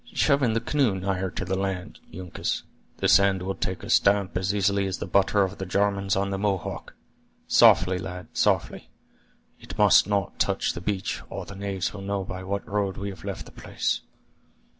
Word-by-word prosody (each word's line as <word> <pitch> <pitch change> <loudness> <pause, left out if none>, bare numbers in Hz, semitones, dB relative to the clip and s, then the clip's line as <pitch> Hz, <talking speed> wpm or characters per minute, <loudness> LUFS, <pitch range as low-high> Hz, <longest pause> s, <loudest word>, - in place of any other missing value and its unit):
Shove 140 -2 +3
in 120 -4 +2
the 115 - +1
canoe 125 -3 +1
nigher 95 0 -2
to 95 - -5
the 95 +1 -1
land, 95 -1 -3
Uncas; 90 0 -4 0.3
this - - +3
sand 95 -1 +4
will 95 +1 -2
take 95 -1 -4
a - - -7
stamp 100 -1 +3
as 95 +2 0
easily 100 -1 +1
as 95 - -3
the - - -4
butter 100 +1 +3
of 95 +1 -4
the 95 - -3
Jarmans 100 0 +1
on 100 0 0
the 95 - -2
Mohawk. 100 -3 -3 0.5
Softly, 90 +1 +5
lad, 90 -1 -7
softly; - - 0 0.7
it - - -10
must - - +6
not 100 -1 -1
touch - - +1
the 85 - -7
beach, 95 0 -2
or - - -6
the - - -9
knaves 100 -2 -3
will 100 - -7
know 100 0 -2
by 95 0 -7
what 100 +1 -4
road 100 -1 -1
we 100 +1 -4
have 95 -4 -12
left - - -5
the - - -13
place." - - -2
95 Hz, 195 wpm, -26 LUFS, 95-100 Hz, 0.7 s, must